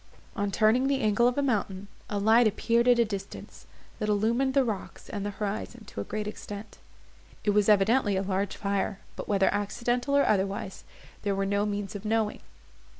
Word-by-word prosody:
On 205 -2 -1
turning 220 +6 +3
the 275 -1 +1
angle 215 +2 +3
of 250 - 0
a 285 - +2
mountain, 205 -6 -1 0.2
a 205 - -2
light 220 +3 +5
appeared 235 +3 +1
at 245 -1 +6
a 235 - +4
distance, 200 -2 -8 0.3
that 210 - -1
illumined 235 +6 +1
the 275 - +5
rocks, 220 -6 -5
and 205 -2 -4
the 205 - -2
horizon 210 +3 -4
to 100 - -6
a - - -3
great 210 - -4
extent. 210 0 -8 0.6
It 205 - +2
was 210 0 +3
evidently 210 +1 +4
a 190 - 0
large 195 0 -1
fire, 200 0 -1 0.2
but - - -7
whether 195 -2 +2
accidental, 240 +6 0
or 280 - +4
otherwise, 195 -1 -1 0.4
there 200 -2 0
were 195 0 0
no 200 +1 +1
means 205 -2 -3
of 205 -1 -7
knowing. 220 -1 0
210 Hz, 190 wpm, -28 LUFS, 200-235 Hz, 0.6 s, at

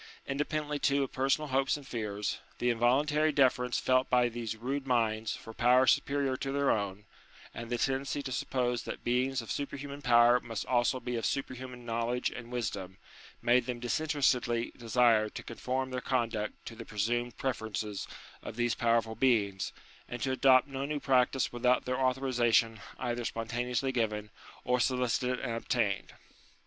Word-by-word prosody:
Independently, 150 +1 -2
too, 140 0 +2
of 135 - -4
personal 135 +3 0
hopes 135 +2 +1
and 145 - -12
fears, 105 -5 -3 0.2
the 125 - +2
involuntary 145 +7 +2
deference 125 -3 +2
felt 130 0 +2
by 125 -1 +4
these 115 -1 -4
rude 135 +5 -3
minds 115 -3 +1
for 115 - -10
power 125 +3 +4
superior 140 0 +2
to 135 +1 -3
their 140 0 +2
own, 100 -1 -2 0.5
and 115 0 -7
the 120 - 0
tendency 135 +3 -1
to 135 - -5
suppose 125 -1 -1
that - - -7
beings 125 +1 0
of 115 - -7
superhuman 140 0 -5
power 120 -1 +5
must 115 -4 -5
also 125 +1 +2
be 125 -1 -3
of 115 - -2
superhuman 130 -2 -5
knowledge 115 +2 -1
and 120 0 -9
wisdom, 100 -6 -4 0.5
made 120 0 +3
them 125 -1 -3
disinterestedly 125 -3 +1
desire 115 -2 +3
to - - -8
conform 130 +2 -3
their 125 0 -3
conduct 115 -5 -1
to 115 - -7
the 115 - -8
presumed 120 +3 -2
preferences 110 -5 -3 0.3
of - - -7
these 120 0 +1
powerful 115 -1 +1
beings, 105 -6 +1 0.4
and 120 -1 -5
to 135 - 0
adopt 130 0 +5
no 135 -1 -4
new 145 +1 -2
practice 130 -2 +2
without 125 +1 +2
their 125 +1 -1
authorization 125 -4 +2 0.2
either 120 -1 -2
spontaneously 120 +3 -2
given, 105 -4 -2 0.3
or 125 0 +1
solicited 125 0 +1
and 115 - -3
obtained. 115 - -1
125 Hz, 160 wpm, -31 LUFS, 115-130 Hz, 0.5 s, power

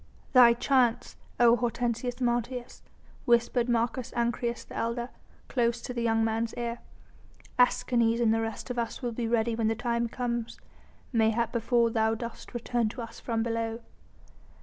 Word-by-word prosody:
"Thy 245 -2 +8
chance, 245 -1 +1 0.2
O 240 -1 +7
Hortensius 240 +1 -2
Martius," 240 0 -2 0.4
whispered 235 +1 +2
Marcus 240 +1 0
Ancyrus, 235 0 -1
the - - -12
elder, 235 +1 -2 0.4
close 235 -2 +1
to 250 - -5
the 240 - -3
young 225 -1 +2
man's 225 +1 -1
ear. 235 0 -3 0.8
"Escanes 235 -2 +3
and 225 -2 +3
the 225 - +1
rest 225 +3 -4
of 245 - -2
us 235 +3 -4
will 240 - -1
be 230 0 -3
ready 230 0 +1
when 225 -1 0
the 225 - +1
time 235 0 -1
comes, 235 -1 -3 0.5
mayhap 225 0 +2
before 235 0 +2
thou 220 0 +2
dost 235 +2 -8
return 240 -1 0
to 240 - -9
us 230 - -10
from 225 -2 -1
below." 230 0 -2
235 Hz, 155 wpm, -28 LUFS, 230-240 Hz, 0.8 s, Thy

